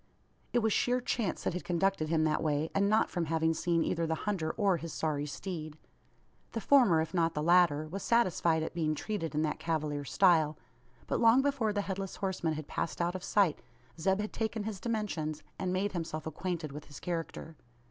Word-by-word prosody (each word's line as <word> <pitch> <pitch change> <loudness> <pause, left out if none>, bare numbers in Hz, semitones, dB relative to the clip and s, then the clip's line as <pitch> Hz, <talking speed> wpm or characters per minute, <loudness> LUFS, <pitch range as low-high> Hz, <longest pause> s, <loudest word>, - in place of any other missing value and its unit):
It 240 -2 +2
was 220 -2 +2
sheer 250 +1 +2
chance 235 -6 -2
that - - -1
had 180 - -4
conducted 175 -2 0
him 160 -1 +2
that 155 -1 +1
way; 155 0 0
and 200 0 +2
not 220 +1 +3
from 175 -2 -1
having 160 +1 +1
seen 165 0 +1
either 165 -1 -1
the 160 - 0
hunter 190 -7 -1
or 200 -5 +3
his 165 0 -6
sorry 150 -2 -1
steed. 155 -1 -6 0.8
The 230 - -1
former 225 - +5
if 160 +2 -4
not 165 -2 +1
the 150 - -1
latter 170 -3 +4
was 195 +5 -5
satisfied 175 -8 +2
at - - -4
being 155 -3 0
treated 165 -3 -3
in 155 - +2
that 150 -1 -1
cavalier 155 -3 -2
style; 160 -1 +3 0.5
but, - - -1
long 230 +3 +6
before 275 -6 +1
the 205 0 0
Headless 195 -1 -4
Horseman 185 -4 -1
had 155 -1 -5
passed - - -3
out 175 0 0
of 185 -1 -6
sight, 195 -8 +2 0.4
Zeb 190 +4 +2
had 210 - -5
taken 220 -1 -2
his 210 -2 -4
dimensions, 185 -10 -2 0.2
and 185 -1 -1
made 195 +2 0
himself 165 -3 -4
acquainted 165 -1 -3
with 150 +1 -8
his 145 - -11
character. 165 -1 -5
170 Hz, 200 wpm, -31 LUFS, 155-200 Hz, 0.8 s, long